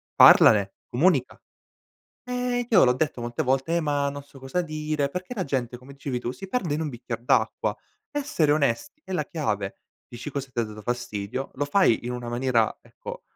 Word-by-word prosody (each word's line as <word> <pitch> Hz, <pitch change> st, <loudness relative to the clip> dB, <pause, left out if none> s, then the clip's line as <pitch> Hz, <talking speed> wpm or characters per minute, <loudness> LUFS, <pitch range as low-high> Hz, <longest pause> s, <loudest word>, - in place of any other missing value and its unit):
parlane, 100 Hz, -2 st, +7 dB, 0.2 s
comunica 140 Hz, -1 st, +2 dB, 0.8 s
eh 250 Hz, -1 st, -1 dB
io 205 Hz, -7 st, +6 dB
l'ho 125 Hz, -, +5 dB
detto 135 Hz, 0 st, -1 dB
molte 120 Hz, +5 st, -2 dB
volte: 135 Hz, +6 st, +1 dB
"Eh -, -, +2 dB
ma 145 Hz, -2 st, 0 dB
non 145 Hz, 0 st, -7 dB
so 140 Hz, 0 st, -16 dB
cosa 135 Hz, +7 st, -1 dB
dire." 155 Hz, -2 st, -2 dB
Perché 180 Hz, -, -6 dB
la 195 Hz, -5 st, -2 dB
gente, 125 Hz, -4 st, -2 dB
come 130 Hz, +3 st, -13 dB
dicevi 135 Hz, -2 st, -4 dB
tu, 120 Hz, 0 st, -4 dB
si 195 Hz, -, -9 dB
perde 185 Hz, -9 st, -1 dB
in 155 Hz, -, -2 dB
un 155 Hz, -, -2 dB
bicchier 120 Hz, -2 st, -6 dB
d'acqua, 120 Hz, -, +1 dB, 0.4 s
essere 285 Hz, -, +1 dB
onest 145 Hz, -, +1 dB
è 190 Hz, -, -7 dB
la 155 Hz, -5 st, 0 dB
chiave, 105 Hz, -, -2 dB, 0.3 s
dici 120 Hz, +5 st, -7 dB
cosa 135 Hz, -1 st, -5 dB
t'ha 120 Hz, -, 0 dB
dato 110 Hz, 0 st, -9 dB
fastidio, 120 Hz, +1 st, -3 dB
lo 145 Hz, -, -1 dB
fai 145 Hz, -, +3 dB
in 125 Hz, -, -3 dB
una 125 Hz, -1 st, -5 dB
maniera 120 Hz, -2 st, +1 dB
ecco -, -, -9 dB
140 Hz, 190 wpm, -25 LUFS, 120-160 Hz, 0.8 s, parlane